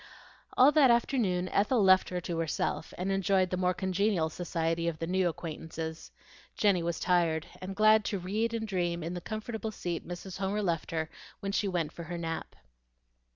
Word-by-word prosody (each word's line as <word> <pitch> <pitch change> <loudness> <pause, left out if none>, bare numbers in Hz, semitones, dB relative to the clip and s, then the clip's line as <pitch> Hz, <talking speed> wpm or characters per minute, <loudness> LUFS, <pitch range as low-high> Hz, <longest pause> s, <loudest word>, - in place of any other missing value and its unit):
All 260 +3 +8
that 300 -4 +6
afternoon 225 -7 +2
Ethel 210 +2 +2
left 190 -1 +5
her 180 - -2
to 170 -1 -3
herself, 160 0 -2
and 185 +2 -1
enjoyed 195 -1 +2
the - - +1
more 180 0 +1
congenial 190 -3 +1
society 165 -1 -1
of 165 -2 -1
the 165 - -3
new 185 +1 +1
acquaintances. 160 -1 -6 0.5
Jenny 200 -4 +3
was 170 0 -2
tired, 170 -3 +2 0.2
and 190 +1 -5
glad 215 +1 +5
to 205 - -1
read 210 +6 -1
and 220 -1 -3
dream 175 -4 -1
in 170 +2 -3
the 175 - -5
comfortable 220 +2 -4
seat 175 -5 -4
Mrs. 180 +2 -7
Homer 200 +2 -1
left 170 -4 -1
her 160 -2 -1 0.3
when 195 -1 -3
she 200 0 0
went 175 -5 -1
for 170 - -8
her 175 +2 -5
nap. 165 -1 -4
180 Hz, 185 wpm, -30 LUFS, 170-200 Hz, 0.5 s, All